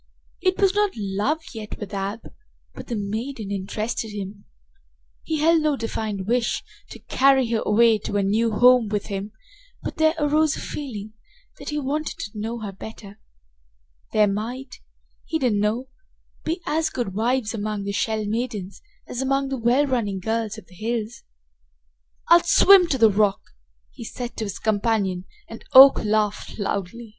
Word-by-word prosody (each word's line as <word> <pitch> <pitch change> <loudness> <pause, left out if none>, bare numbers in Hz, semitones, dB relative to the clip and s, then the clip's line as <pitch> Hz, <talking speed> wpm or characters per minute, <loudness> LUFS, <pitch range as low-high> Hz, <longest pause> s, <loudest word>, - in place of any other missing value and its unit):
It 370 -1 +1
was 390 -2 +4
not 415 -1 +1
love 210 +10 -1
yet 215 -2 -7
with 210 -1 -8
Ab, 200 +3 -3 0.5
but - - -10
the 240 - -3
maiden 215 +2 -4
interested 215 +4 -3
him. 200 -1 -7 0.8
He 320 - -2
held 325 +1 +4
no 305 -2 +1
defined 220 -5 -4
wish 235 +2 0 0.3
to - - -9
carry 265 -1 +3
her 225 - +1
away 225 +1 +4
to 205 - -3
a 200 - +1
new 220 +4 +1
home 245 +1 +5
with 205 -1 -2
him, 195 +2 -4 0.5
but - - -5
there 315 +1 +3
arose 305 +1 +2
a - - -6
feeling 220 -7 -6 0.5
that - - -7
he 300 - -2
wanted 295 +3 -3
to 205 - -6
know 225 +2 -4
her 205 -2 -5
better. 205 +1 -11 0.9
There 215 -1 +4
might, 240 +6 -4 0.5
he 320 - -2
didn't 245 -8 +1
know 220 +5 0 0.6
be 335 +3 -2
as 320 +1 0
good 235 -7 -3
wives 235 +2 0
among 210 -2 -3
the 200 - -3
Shell 215 +1 -1
maidens 210 -3 -4 0.2
as 245 - -5
among 275 0 0
the 270 - -2
well 245 +5 +3
running 225 -8 -1
girls 220 +2 -2
of 220 - -11
the - - -20
hills. 225 +3 -4 1.1
"I'll 345 0 +7
swim 385 0 +6
to 275 - 0
the 225 -3 +5
rock!" 205 -1 +2 0.5
he - - -10
said 240 +1 -6
to 220 - -2
his 200 -2 -5
companion, 205 -4 0 0.2
and 225 - -10
Oak 270 +1 +9
laughed 210 -1 -1
loudly. 205 +2 -4
225 Hz, 165 wpm, -23 LUFS, 205-265 Hz, 1.1 s, Oak